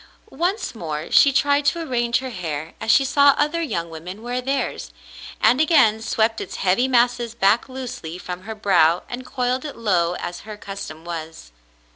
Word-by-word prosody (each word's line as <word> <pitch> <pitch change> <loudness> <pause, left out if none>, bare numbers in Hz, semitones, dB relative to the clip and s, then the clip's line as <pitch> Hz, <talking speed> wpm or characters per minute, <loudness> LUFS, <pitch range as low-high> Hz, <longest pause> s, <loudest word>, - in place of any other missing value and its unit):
Once 370 - -2
more 155 -7 -5
she 280 - +6
tried 285 +1 +2
to 335 +4 +1
arrange 240 -6 0
her 260 0 -5
hair 160 -5 -5
as 220 - -4
she 270 +4 +5
saw 280 +1 +5
other 300 +3 0
young 170 - -2
women 180 +7 -8
wear 245 +1 -3
theirs, 270 +2 -2 0.5
and 245 +6 +4
again 255 -9 +4
swept 225 0 0
its - - -7
heavy 195 +7 +2
masses 240 -2 +1
back 215 +4 +2
loosely 250 -10 -6
from 180 0 -7
her 220 +3 -7
brow 175 -5 +3
and 250 +1 -7
coiled 250 0 -1
it 300 - -7
low 180 -6 +1
as 175 0 -6
her 215 -1 -9
custom 185 -6 -8
was. 160 - -7
225 Hz, 175 wpm, -22 LUFS, 180-260 Hz, 0.5 s, she